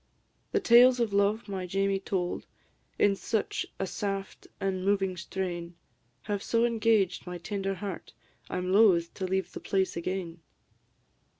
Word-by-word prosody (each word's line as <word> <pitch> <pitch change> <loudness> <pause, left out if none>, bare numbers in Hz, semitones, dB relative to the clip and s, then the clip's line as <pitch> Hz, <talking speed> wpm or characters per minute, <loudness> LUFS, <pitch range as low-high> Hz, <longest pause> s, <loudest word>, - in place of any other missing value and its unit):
The 420 - +2
tales 245 -4 +6
of 230 -4 0
love 200 +3 +2
my 190 -2 -4
Jamie 195 +1 +1
told, 185 -2 -3 0.5
In 200 -1 +4
such 220 +2 -2
a - - -1
saft 195 0 -4
an' 190 -1 -1
moving 195 -1 +1
strain, 175 -1 -4 0.5
Have 205 -1 -2
so 230 +2 +2
engaged 220 -6 +1
my 180 0 -4
tender 195 +2 -3
heart, 195 -2 -6 0.4
I - - -3
'm 180 +1 -1
loth 190 -5 +5
to 190 - -3
leave 190 -1 -1
the - - -6
place 190 -1 0
again. 170 0 -4
195 Hz, 145 wpm, -29 LUFS, 185-205 Hz, 0.5 s, tales